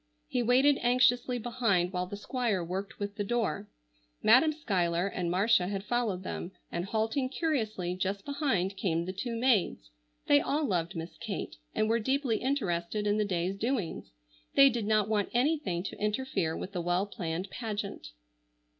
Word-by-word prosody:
He 250 - 0
waited 260 +4 +4
anxiously 245 0 +3
behind 225 -7 0
while 180 0 -1
the 200 - -6
Squire 220 -4 -1
worked 190 +4 -4
with 205 0 -5
the 205 - 0
door. 210 -2 -1 0.5
Madam 255 +8 +6
Schuyler 180 - 0
and 180 -3 -2
Marcia 190 +1 +3
had 195 0 -3
followed 215 -5 -1
them, 185 0 -5 0.2
and 170 +1 -2
halting 225 +6 0
curiously 220 - -1
just 195 +2 -2
behind 265 - 0
came 170 -3 0
the 185 - -4
two 230 +5 -3
maids. 225 - +1 0.3
They 145 - +5
all 300 +2 0
loved 175 -6 -1
Miss 165 +1 -6
Kate - - -5 0.2
and 215 - +2
were 230 +1 +2
deeply 260 0 +1
interested 210 -7 -1
in 205 0 +2
the 210 - +2
day's 185 0 -1
doings. 225 - -2 0.4
They 275 -1 +8
did 230 -3 -2
not 215 -2 +3
want 210 -2 0
anything 255 - +1
to 190 - -6
interfere 210 -6 -1
with 195 - -6
the 180 -3 -3
well 175 +3 +1
planned 180 -1 -4
pageant. 210 - -4
205 Hz, 165 wpm, -30 LUFS, 180-245 Hz, 0.5 s, They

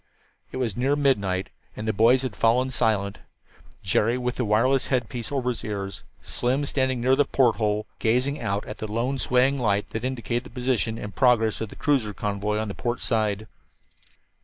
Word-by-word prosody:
It - - -5
was 120 -6 -1
near 135 +4 +1
midnight, 100 -10 +1 0.2
and 105 - -5
the 110 - +1
boys 120 +6 +4
had 125 -6 -4
fallen 125 +5 +2
silent, 100 -5 0 0.6
Jerry 110 +5 +2
with 125 0 -2
the 125 - 0
wireless 125 +6 +2
headpiece 120 -2 -2
over 130 -3 0
his 120 - -3
ears, 100 -3 -4 0.2
Slim 130 +4 -1
standing 130 -3 0
near 130 +2 +4
the 145 - +4
porthole, 110 -6 +1
gazing 125 +6 +1
out 100 +1 -2
at 105 - -8
the 110 -1 -5
lone 125 +5 -1
swaying 130 +3 +2
light 105 -4 0
that 110 - -4
indicated 125 -1 -2
the - - -10
position 125 -2 -1
and 105 -3 -7
the - - -27
progress 115 -5 +3
of 110 - -3
the - - -11
cruiser 125 -9 0
convoy 105 +2 -2
on 110 0 -2
the 100 - -4
port 120 +3 -3
side. 110 -2 0
115 Hz, 185 wpm, -25 LUFS, 105-130 Hz, 0.6 s, boys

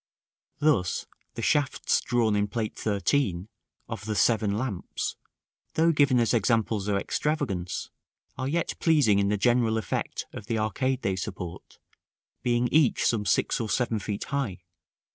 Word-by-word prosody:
Thus, 145 -12 +1 0.3
the - - -4
shafts 145 -3 +2
drawn 115 -4 +1
in 105 0 +1
Plate 110 +1 -3
XIII., 100 -3 0 0.4
of 115 -2 -6
the 110 -1 -2
"Seven 105 -2 +2
Lamps," 110 -7 -3 0.6
though 165 +1 +4
given 140 -5 +4
as 115 0 +2
examples 110 -2 +1
of 100 -1 +2
extravagance, 100 - -2 0.4
are 130 - -3
yet 165 +4 -1
pleasing 145 -12 +4
in 100 - +2
the 105 +1 +1
general 115 +1 +2
effect 110 -6 -3
of 105 - -8
the 115 -2 0
arcade 130 +5 -1
they 95 -1 +1
support; 95 -3 -7 0.6
being 120 0 +1
each 150 -5 +3
some 105 -3 +1
six - - +2
or 110 - -3
seven 115 0 0
feet 100 0 -4
high. 115 -11 -3
110 Hz, 145 wpm, -27 LUFS, 100-130 Hz, 0.6 s, though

